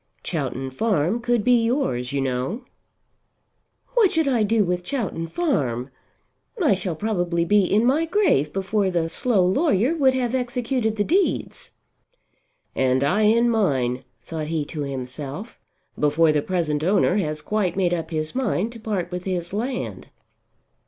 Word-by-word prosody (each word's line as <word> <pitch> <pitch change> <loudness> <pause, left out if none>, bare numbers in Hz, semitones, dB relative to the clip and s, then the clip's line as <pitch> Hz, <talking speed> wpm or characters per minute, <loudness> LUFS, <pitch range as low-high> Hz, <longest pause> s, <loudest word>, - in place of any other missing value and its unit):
"Chowton 130 +1 -3
Farm 195 - 0
could 240 -2 0
be 245 -1 +4
yours, 230 - 0
you 140 -1 -1
know." 135 - -2 1.3
"What 455 -6 +4
should 320 -2 +2
I 250 -4 +2
do 215 +1 +3
with 180 -1 -1
Chowton 185 -8 -3
Farm? 140 - -1 0.7
I 310 - +4
shall 185 -3 -3
probably 175 -3 -1
be 205 +2 +4
in 215 +5 +2
my 290 +6 +3
grave 325 - +2
before 195 +2 0
the 170 -3 0
slow 205 -2 +1
lawyer 250 - +2
would 265 -4 +3
have 245 -2 -1
executed 245 -2 -1
the 205 - +1
deeds." 370 - 0 1.1
And 130 0 +2
I 185 +10 +2
in 230 +3 +4
mine, 130 - 0 0.2
thought 155 -2 -5
he 155 -2 -1
to 150 +1 -6
himself, 140 - -6 0.4
before 150 +2 +3
the 150 -1 +1
present 155 -4 -1
owner 190 +1 +3
has 155 -5 -2
quite 205 -5 -1
made 180 -2 +1
up 165 -2 -3
his 155 -1 -3
mind 230 -4 -1
to 235 - -10
part 200 -5 -3
with 180 0 -5
his 180 -2 -3
land. 245 +5 -4
190 Hz, 150 wpm, -23 LUFS, 155-235 Hz, 1.3 s, be